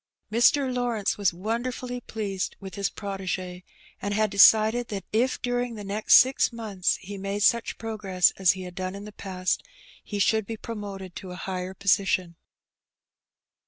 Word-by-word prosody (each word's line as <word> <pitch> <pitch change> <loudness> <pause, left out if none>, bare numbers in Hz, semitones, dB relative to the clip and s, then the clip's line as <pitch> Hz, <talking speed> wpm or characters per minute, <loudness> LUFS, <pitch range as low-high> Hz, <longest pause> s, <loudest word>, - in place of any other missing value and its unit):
Mr. 255 +4 +3
Lawrence 240 -5 0
was 200 -3 +2
wonderfully 240 +6 -3
pleased 200 -5 -4
with 190 -2 -9
his 200 +2 -1
protege, 185 -2 -5 0.4
and 205 0 -2
had 215 -1 +1
decided 220 +3 +6
that 195 -3 -5
if 245 +4 +1
during 245 -1 -1
the 210 - -7
next 205 +2 +3
six 260 0 +5
months 215 -6 -1
he 200 +1 -8
made 200 +1 -2
such 235 +1 +2
progress 205 -5 +1
as 185 -4 +4
he 190 0 -7
had 180 -1 -8
done 185 0 -4
in 200 +1 -8
the 210 - -9
past, 185 -2 -2 0.4
he 205 - -5
should 215 +1 +2
be 225 - -5
pro 230 - -6
moted 195 -4 -7
to 190 - -8
a 180 - -7
higher 185 0 -5
position. 185 -3 +1
205 Hz, 165 wpm, -26 LUFS, 190-225 Hz, 0.4 s, decided